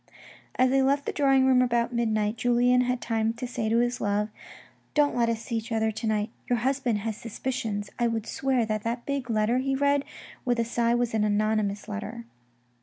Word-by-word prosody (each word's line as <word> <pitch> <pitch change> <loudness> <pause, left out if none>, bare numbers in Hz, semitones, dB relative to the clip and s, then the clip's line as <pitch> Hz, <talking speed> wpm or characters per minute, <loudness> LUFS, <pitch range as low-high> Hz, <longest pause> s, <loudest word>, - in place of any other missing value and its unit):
As 255 0 +3
they 270 0 +4
left 275 +2 +2
the - - -1
drawing 270 -2 +3
room 260 -1 +5
about 240 -1 +1
midnight, 215 -2 0
Julien 245 +1 +3
had 250 0 -1
time 225 -1 0
to 235 +2 -6
say 240 -3 -2
to 230 - +2
his 240 +1 0
love, 205 +1 0 0.3
" - - -29
Don't 295 -1 +3
let 235 -1 +2
us 230 0 -2
see 230 0 -2
each 225 +2 -6
other 220 0 +1
to 220 +1 -4
night. 215 0 0 0.2
Your 245 - +3
husband 255 -1 0
has 220 0 -3
suspicions. 225 -3 -4
I 240 - +3
would 225 -2 -2
swear 260 -3 0
that 215 -1 -2
that 235 +2 -3
big 280 -3 -3
letter 220 +2 +2
he 270 +1 0
read 280 0 +2 0.4
with 245 -2 0
a 230 - +2
sigh 235 0 +1
was 240 -1 0
an 220 -1 +2
anonymous 210 -1 0
letter." 215 +2 -6
235 Hz, 210 wpm, -27 LUFS, 220-250 Hz, 0.4 s, room